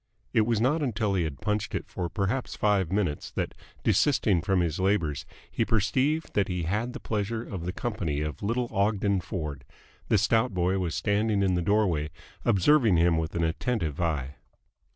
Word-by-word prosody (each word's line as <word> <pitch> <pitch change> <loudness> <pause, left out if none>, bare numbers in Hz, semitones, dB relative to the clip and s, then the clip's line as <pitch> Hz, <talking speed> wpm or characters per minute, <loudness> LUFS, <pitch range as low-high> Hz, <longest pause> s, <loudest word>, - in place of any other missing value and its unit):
It 110 -3 +3
was 115 -3 +2
not 140 +8 +2
until 110 -6 0
he 90 -3 +1
had 70 -3 -6
punched 105 +1 -1
it - - -3
for 90 -2 -4
perhaps 105 +7 -2
five 100 -5 +1
minutes 95 -7 -1
that, - - -2 0.3
desisting 105 - +3
from 95 +2 +1
his 85 +1 -1
labours, 95 -7 0 0.2
he - - +1
perceived 130 +9 +1
that 100 - +2
he 90 -2 -2
had 105 +9 -1
the - - -6
pleasure 110 +1 -2
of 95 -7 -6
the - - 0
company 95 - -2
of 75 -1 -4
little 120 +4 0
Ogden 100 -1 +1
Ford. 75 -5 -5 0.4
The - - +3
stout 115 -2 +2
boy 90 +2 +1
was 85 -3 -2
standing 105 0 +1
in 95 -1 +2
the 90 - +1
doorway, 85 -5 +1 0.3
observing 110 - +4
him 85 0 +3
with 80 +1 -3
an 85 - 0
attentive 80 - -1
eye. 75 -5 -2
100 Hz, 180 wpm, -27 LUFS, 85-110 Hz, 0.4 s, observing